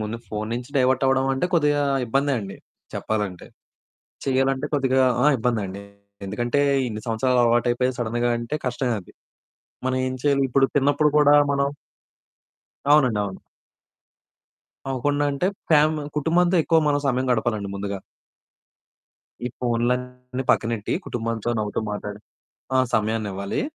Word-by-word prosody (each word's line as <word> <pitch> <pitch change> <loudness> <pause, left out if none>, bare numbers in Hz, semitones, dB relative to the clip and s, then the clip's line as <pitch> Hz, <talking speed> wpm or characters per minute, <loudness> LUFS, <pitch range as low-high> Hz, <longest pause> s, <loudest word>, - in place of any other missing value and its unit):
ముందు 110 +2 -3
ఫోను 105 +1 -4
నుంచి 125 +2 -5
డైవర్ట్ 130 0 +3
అవ్వడం 135 0 +2
అంటే 135 +6 0
కొద్దిగా 145 -3 +3 0.2
ఇబ్బందే 135 +4 +1
అండి 95 -1 -7 0.4
చెప్పాలంటే. 105 -5 -3 0.8
చెయ్యాలంటే 135 +1 +1
కొద్దిగా 130 -2 +2 0.2
ఆ! - - +5
ఇబ్బందండి. 105 -4 -2 0.4
ఎందుకంటే 120 +7 -1 0.3
ఇన్ని 110 -2 -5
సంవత్సరాలు 125 +3 +1
అలవాటయిపోయి 120 +2 +2
సడెన్‌గా 120 +1 0
అంటే 120 +5 -3
కష్టమే 125 -1 0
అది. 90 - -17 0.8
మనం 130 0 0
ఏం 130 - -3
చేయాలి? 140 -2 +3
ఇప్పుడు 135 +2 +4
తిన్నప్పుడు 145 +2 +3
కూడా 145 -1 +6 0.2
మనం 140 0 +1 1.3
అవునండి. 130 -8 +4
అవును. 95 -2 -6 1.5
అవ్వకుండా 145 +3 0
అంటే, 140 +6 0 0.2
ఫ్యామి 155 -1 +4
కుటుంబంతో 175 +4 +2
ఎక్కువ 165 0 +4
మనం 145 -1 +2
సమయం 130 0 0
గడపాలండి 110 -4 -1
ముందుగా. 100 0 -4 1.5
ఈ - - +1
ఫోన్లన్ని 125 +2 -2
పక్కనెట్టి 115 -2 0
కుటుంబంతో 115 -1 -3
నవ్వుతూ 105 -1 -2
మాట్లాడే 105 0 -5 0.6
ఆ! - - +4 0.2
సమయాన్నివ్వాలి. 105 -3 -1
125 Hz, 120 wpm, -23 LUFS, 110-140 Hz, 1.5 s, కూడా